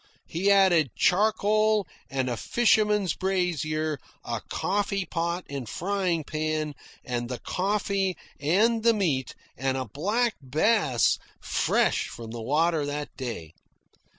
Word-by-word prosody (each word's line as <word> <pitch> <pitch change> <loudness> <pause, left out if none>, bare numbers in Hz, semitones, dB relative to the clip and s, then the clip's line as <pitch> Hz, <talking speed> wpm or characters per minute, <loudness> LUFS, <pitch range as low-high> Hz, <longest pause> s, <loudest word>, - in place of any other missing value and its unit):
He 185 +5 0
added 180 - +4
charcoal 215 +1 +3 0.2
and 130 -2 -1
a 120 - -1
fisherman's 210 - +2
brazier, 155 -5 -1 0.2
a - - -3
coffee 200 0 -1
pot 170 +1 -2
and 135 -5 -5
frying 185 -3 -1
pan, 155 0 -2 0.3
and 120 -1 -3
the 125 - -3
coffee 195 - -1 0.2
and 215 +10 +3
the 230 0 +4
meat, 145 - 0 0.2
and 135 +1 -1
a 130 - -2
black 210 - 0
bass 140 - +2 0.2
fresh - - +1
from 115 -1 -8
the 115 0 -6
water 155 +5 +2
that 145 +1 -4
day. 115 - -6
170 Hz, 125 wpm, -27 LUFS, 140-200 Hz, 0.3 s, added